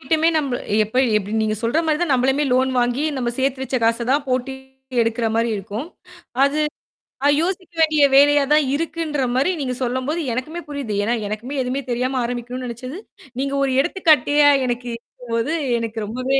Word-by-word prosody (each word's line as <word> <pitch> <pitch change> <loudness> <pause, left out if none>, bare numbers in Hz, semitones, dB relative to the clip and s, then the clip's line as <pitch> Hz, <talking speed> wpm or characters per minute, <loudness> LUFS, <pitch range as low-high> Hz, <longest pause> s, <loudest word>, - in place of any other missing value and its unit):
கிட்டயுமே 315 +4 +2
நம்ம 270 -5 -2 0.3
எப்ப 220 +4 -7 0.2
எப்படி 205 +2 -5
நீங்க 215 0 0
சொல்ற 235 +8 +1
மாரி 310 -1 +1
தான் 310 -6 +1
நம்மளுமே 265 +3 +2
லோன் 260 +1 +2
வாங்கி 245 +4 0
நம்ம 245 -2 -1
சேர்த்து 265 0 0
வச்ச 265 - -2
காச 230 +1 +1
தான் 285 0 +1
போட்டு 255 +1 -1 0.5
எடுக்குற 230 0 -1
மாரி 230 +1 +1
இருக்கும். 210 - -5 0.6
அது 285 +2 +1 0.8
யோசிக்க 365 0 -3
வேண்டிய 310 -2 +4
வேலையா 290 +1 +6
தான் 305 -2 +4
இருக்குன்ற 315 -2 -2
மாரி 270 +8 +2
நீங்க 255 -2 -2
சொல்லும்போது 260 +6 -1
எனக்குமே 310 +8 -4
புரியுது. 280 -7 -4
ஏன்னா, 230 - +1
எனக்குமே 215 +7 -5
எதுவுமே 255 +2 -2
தெரியாம 255 +2 -1
ஆரம்பிக்கனும்னு 245 +1 -4
நினைச்சது 255 +6 -7 0.4
நீங்க 275 +1 -1
ஒரு 270 - +1
எடுத்துக்காட்டியா 295 -4 +4 0.2
எனக்கு 245 0 -3
இருக்கும்போது 235 +3 -4 0.3
எனக்கு 230 -1 -4
ரொம்பவே 255 +5 0
260 Hz, 160 wpm, -21 LUFS, 240-290 Hz, 0.8 s, வேலையா